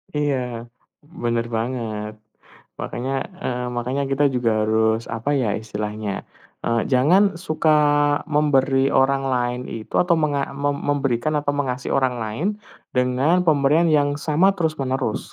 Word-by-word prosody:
Iya, 125 Hz, -5 st, -1 dB, 0.4 s
benar 120 Hz, -7 st, -2 dB
banget. 110 Hz, -3 st, -3 dB, 0.7 s
Makanya, 130 Hz, +3 st, -4 dB, 0.3 s
e -, -, 0 dB
eee, 125 Hz, 0 st, -2 dB
makanya 125 Hz, +4 st, -1 dB
kita 140 Hz, +2 st, +2 dB
juga 120 Hz, -2 st, +1 dB
harus 110 Hz, +1 st, +1 dB
apa 115 Hz, +5 st, -2 dB
ya 120 Hz, -7 st, +1 dB
istilahnya, 105 Hz, -1 st, -4 dB, 0.5 s
eee, 115 Hz, -1 st, +1 dB
jangan 150 Hz, +10 st, +5 dB, 0.2 s
suka 155 Hz, -2 st, 0 dB, 0.6 s
memberi 135 Hz, -2 st, +2 dB
orang 135 Hz, +1 st, +2 dB
lain 125 Hz, 0 st, -1 dB
itu 110 Hz, -1 st, -8 dB
atau 175 Hz, -1 st, +3 dB
menga 145 Hz, -3 st, -1 dB
mem 140 Hz, +1 st, -1 dB
memberikan 135 Hz, -1 st, 0 dB
atau 145 Hz, 0 st, -1 dB
mengasih 130 Hz, -2 st, -1 dB
orang 130 Hz, -2 st, +1 dB
lain, 110 Hz, -, -3 dB, 0.5 s
dengan 125 Hz, +7 st, +2 dB
pemberian 155 Hz, 0 st, +3 dB
yang 145 Hz, -1 st, +2 dB
sama 165 Hz, +7 st, +3 dB
terus-menerus. 135 Hz, -, -2 dB
135 Hz, 130 wpm, -22 LUFS, 120-145 Hz, 0.7 s, jangan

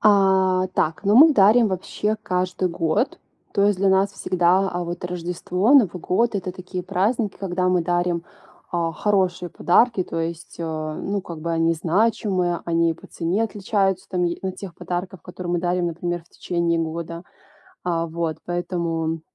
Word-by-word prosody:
А, 190 Hz, -2 st, +4 dB
так, 160 Hz, +4 st, 0 dB
ну, 205 Hz, +2 st, +3 dB
мы 310 Hz, +3 st, +9 dB
дарим 215 Hz, +1 st, +5 dB
вообще 210 Hz, +3 st, -2 dB
каждый 180 Hz, 0 st, -1 dB
год. 170 Hz, -, 0 dB, 0.3 s
То 200 Hz, -1 st, +2 dB
есть 205 Hz, -2 st, +2 dB
для 195 Hz, 0 st, +3 dB
нас 190 Hz, +1 st, +3 dB
всегда, 185 Hz, +2 st, +2 dB
а, 175 Hz, -1 st, -3 dB
вот 175 Hz, +1 st, -5 dB
Рождество, 180 Hz, +5 st, -1 dB
Новый 200 Hz, -, +5 dB
год- 225 Hz, +7 st, +1 dB
это 185 Hz, -2 st, -3 dB
такие 185 Hz, 0 st, -6 dB
праздники, 205 Hz, +4 st, 0 dB
когда 185 Hz, -1 st, -1 dB
мы 180 Hz, -2 st, +2 dB
дарим, 175 Hz, 0 st, 0 dB, 0.5 s
а, 170 Hz, -2 st, -1 dB
хорошие 185 Hz, -3 st, 0 dB
подарки, 215 Hz, +4 st, +3 dB
то 165 Hz, -, -4 dB
есть, 165 Hz, 0 st, -5 dB
э, -, -, -4 dB
ну, 160 Hz, +5 st, -3 dB
как 165 Hz, -2 st, -8 dB
бы 170 Hz, -, -3 dB
они 165 Hz, 0 st, +2 dB
значимые, 180 Hz, 0 st, +1 dB
они 170 Hz, 0 st, +2 dB
и -, -, -2 dB
по -, -, -15 dB
цене 180 Hz, +7 st, -1 dB
отличаются 195 Hz, -3 st, -1 dB
там 180 Hz, -2 st, 0 dB
е 170 Hz, 0 st, -1 dB
от 190 Hz, -1 st, -3 dB
тех 190 Hz, -4 st, -8 dB
подарков, 180 Hz, +1 st, -5 dB
которые 180 Hz, -1 st, -6 dB
мы 175 Hz, -, +1 dB
дарим, 175 Hz, 0 st, 0 dB
например, 175 Hz, +1 st, -3 dB
в -, -, -29 dB
течение 170 Hz, -1 st, -1 dB
года. 165 Hz, +1 st, -4 dB, 0.6 s
А, 170 Hz, -2 st, -1 dB
вот. 165 Hz, -1 st, -3 dB
Поэтому, 170 Hz, -2 st, -2 dB
180 Hz, 170 wpm, -23 LUFS, 170-195 Hz, 0.6 s, мы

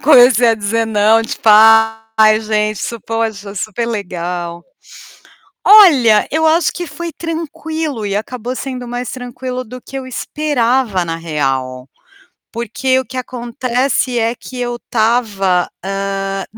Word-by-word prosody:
comecei 245 Hz, -4 st, +6 dB
a 225 Hz, -, +4 dB
dizer 225 Hz, +2 st, -1 dB
"não", 220 Hz, +1 st, +3 dB
tipo: 225 Hz, 0 st, -3 dB, 0.7 s
"Ai 215 Hz, 0 st, +5 dB
gente, 215 Hz, -1 st, -1 dB
isso 235 Hz, -1 st, -5 dB
poxa, 220 Hz, -2 st, -4 dB
super 215 Hz, +4 st, -3 dB
legal". 175 Hz, -5 st, -4 dB, 1.0 s
Olha, 280 Hz, -, +6 dB
eu 320 Hz, +1 st, +1 dB
acho 320 Hz, +1 st, +2 dB
que 350 Hz, -, -5 dB
foi 335 Hz, +3 st, -7 dB
tranquilo 320 Hz, -6 st, -4 dB
e 200 Hz, 0 st, -1 dB
acabou 245 Hz, +3 st, -5 dB
sendo 255 Hz, -2 st, -6 dB
mais 245 Hz, +1 st, -4 dB
tranquilo 255 Hz, 0 st, -6 dB
do 250 Hz, +2 st, -10 dB
que 270 Hz, -, -9 dB
eu 260 Hz, -, -7 dB
esperava, 255 Hz, -7 st, -1 dB
na 165 Hz, -1 st, -4 dB
real. 135 Hz, -6 st, -3 dB, 0.7 s
Porque 235 Hz, +3 st, -1 dB
o 260 Hz, -, -2 dB
que 255 Hz, +2 st, -10 dB
acontece 250 Hz, +1 st, -1 dB
é 230 Hz, +1 st, 0 dB
que 250 Hz, +1 st, -10 dB
eu 240 Hz, 0 st, -2 dB
estava, 215 Hz, -6 st, 0 dB, 0.2 s
hã, 195 Hz, 0 st, -3 dB
235 Hz, 135 wpm, -16 LUFS, 205-255 Hz, 1.0 s, comecei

